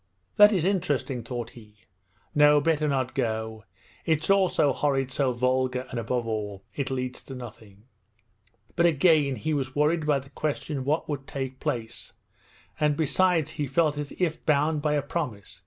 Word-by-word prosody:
That 210 Hz, 0 st, +8 dB
is 180 Hz, -6 st, +1 dB
interesting,' 150 Hz, -, 0 dB
thought 120 Hz, -1 st, -5 dB
he. 105 Hz, -3 st, -16 dB, 0.5 s
'No, 150 Hz, 0 st, +6 dB
better 155 Hz, 0 st, +1 dB
not 130 Hz, -3 st, -1 dB
go. 110 Hz, -1 st, -3 dB, 0.4 s
It's 160 Hz, +3 st, +1 dB
all 195 Hz, -2 st, +4 dB
so 145 Hz, -4 st, +2 dB
horrid, 135 Hz, -2 st, 0 dB
so 130 Hz, 0 st, +1 dB
vulgar, 130 Hz, +1 st, 0 dB
and 125 Hz, -, -3 dB
above 120 Hz, +1 st, -2 dB
all 105 Hz, -3 st, -4 dB
it 140 Hz, -3 st, -3 dB
leads 130 Hz, -1 st, -4 dB
to 135 Hz, -, -8 dB
nothing!' 110 Hz, -4 st, -11 dB, 0.9 s
But 175 Hz, -1 st, +4 dB
again 155 Hz, -3 st, +3 dB
he 155 Hz, +4 st, -2 dB
was 135 Hz, -2 st, -2 dB
worried 150 Hz, +2 st, +1 dB
by 145 Hz, -2 st, +3 dB
the 135 Hz, 0 st, -9 dB
question 150 Hz, -1 st, -3 dB
of 130 Hz, -, -5 dB
what 155 Hz, +3 st, 0 dB
would 140 Hz, -3 st, -4 dB
take 130 Hz, -1 st, -5 dB
place; 115 Hz, -2 st, -4 dB, 0.7 s
and 150 Hz, -1 st, +2 dB
besides 165 Hz, +1 st, +2 dB
he 145 Hz, -, -3 dB
felt 150 Hz, +2 st, +1 dB
as 145 Hz, -1 st, -5 dB
if 165 Hz, -3 st, -1 dB
bound 150 Hz, +1 st, +2 dB
by 150 Hz, 0 st, +1 dB
a 145 Hz, -2 st, +1 dB
promise. 125 Hz, -, -5 dB
140 Hz, 170 wpm, -26 LUFS, 125-155 Hz, 0.9 s, That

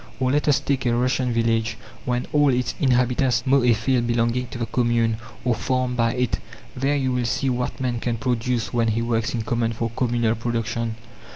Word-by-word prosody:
Or 130 Hz, -1 st, +1 dB
let 145 Hz, +2 st, +1 dB
us 145 Hz, -, +4 dB
take 130 Hz, -2 st, -1 dB
a 120 Hz, -, +2 dB
Russian 125 Hz, +1 st, +1 dB
village, 115 Hz, -1 st, +1 dB, 0.3 s
when 125 Hz, 0 st, -1 dB
all 145 Hz, -1 st, +4 dB
its 125 Hz, -1 st, 0 dB
inhabitants 125 Hz, -3 st, +2 dB
mow 135 Hz, +1 st, +4 dB
a 120 Hz, -1 st, +4 dB
field 120 Hz, +1 st, +1 dB
belonging 120 Hz, +1 st, +1 dB
to 120 Hz, -, -8 dB
the 120 Hz, -, -2 dB
commune, 115 Hz, -2 st, +1 dB, 0.3 s
or 125 Hz, -, +3 dB
farmed 125 Hz, +2 st, -1 dB
by 115 Hz, -1 st, +2 dB
it. 125 Hz, -2 st, 0 dB, 0.4 s
There 135 Hz, +3 st, +1 dB
you 130 Hz, -2 st, 0 dB
will 125 Hz, -1 st, 0 dB
see 130 Hz, +4 st, 0 dB
what 125 Hz, +1 st, -2 dB
man 125 Hz, -2 st, -1 dB
can 115 Hz, 0 st, -2 dB
produce 120 Hz, 0 st, -1 dB
when 115 Hz, -1 st, +2 dB
he 115 Hz, +1 st, 0 dB
works 115 Hz, 0 st, 0 dB
in 115 Hz, -, -2 dB
common 115 Hz, 0 st, 0 dB
for 115 Hz, 0 st, -3 dB
communal 120 Hz, -2 st, +1 dB
production. 115 Hz, 0 st, -2 dB
120 Hz, 200 wpm, -23 LUFS, 115-125 Hz, 0.4 s, us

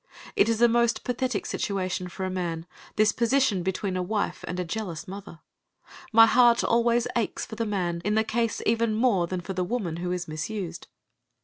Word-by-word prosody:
It -, -, +4 dB
is 225 Hz, -1 st, +1 dB
a -, -, +8 dB
most 235 Hz, 0 st, +2 dB
pathetic 250 Hz, -3 st, -2 dB
situation 185 Hz, -5 st, -2 dB
for 190 Hz, +1 st, -5 dB
a -, -, -2 dB
man, 170 Hz, -3 st, -3 dB, 0.3 s
this 215 Hz, 0 st, +4 dB
position 235 Hz, -4 st, +2 dB
between 190 Hz, +1 st, -2 dB
a 185 Hz, -, 0 dB
wife 205 Hz, +3 st, -2 dB
and 180 Hz, -, -4 dB
a 180 Hz, -, -1 dB
jealous 170 Hz, -3 st, -5 dB
mother. 190 Hz, -3 st, -9 dB, 0.7 s
My 225 Hz, 0 st, +8 dB
heart 240 Hz, 0 st, +5 dB
always 235 Hz, 0 st, +2 dB
aches 235 Hz, -3 st, -1 dB
for -, -, -11 dB
the 225 Hz, 0 st, -2 dB
man 175 Hz, -4 st, -1 dB
in 210 Hz, +3 st, 0 dB
the 220 Hz, -, +3 dB
case 230 Hz, 0 st, -1 dB
even 230 Hz, -1 st, +2 dB
more 215 Hz, -7 st, +2 dB
than 185 Hz, 0 st, -3 dB
for 190 Hz, -, -5 dB
the 185 Hz, 0 st, -1 dB
woman 180 Hz, -5 st, -2 dB
who 180 Hz, +1 st, -3 dB
is 180 Hz, -1 st, -3 dB
misused. 170 Hz, +3 st, -5 dB
205 Hz, 195 wpm, -26 LUFS, 180-230 Hz, 0.7 s, a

